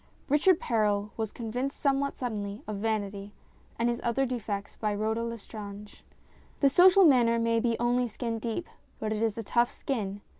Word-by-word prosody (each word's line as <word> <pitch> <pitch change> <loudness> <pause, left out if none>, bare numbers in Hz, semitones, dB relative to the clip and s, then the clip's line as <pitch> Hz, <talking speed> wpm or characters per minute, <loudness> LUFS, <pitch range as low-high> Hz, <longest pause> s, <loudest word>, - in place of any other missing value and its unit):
Richard 315 +5 +4
Perral 210 -2 0
was 220 -2 -3
convinced 245 +4 -4
somewhat 280 0 +1
suddenly 210 -4 -4
of 215 -1 -4
vanity 205 -1 -3 0.4
and 235 - +1
his 240 0 -1
other 240 +3 +1
defects 215 -5 -4
by 210 -2 -1
Rhoda 220 +2 -1
Lestrange. 210 -3 -8 0.6
The 280 - +5
social 370 +4 +7
manner 240 -6 +5
may 230 0 +2
be 235 0 0
only 245 +1 +1
skin 230 0 -4
deep, 230 +8 -3 0.3
but 215 0 -2
it 215 - -3
is 225 -2 0
a 230 - -3
tough 235 +3 +2
skin. 205 -7 -3
230 Hz, 165 wpm, -29 LUFS, 210-245 Hz, 0.6 s, social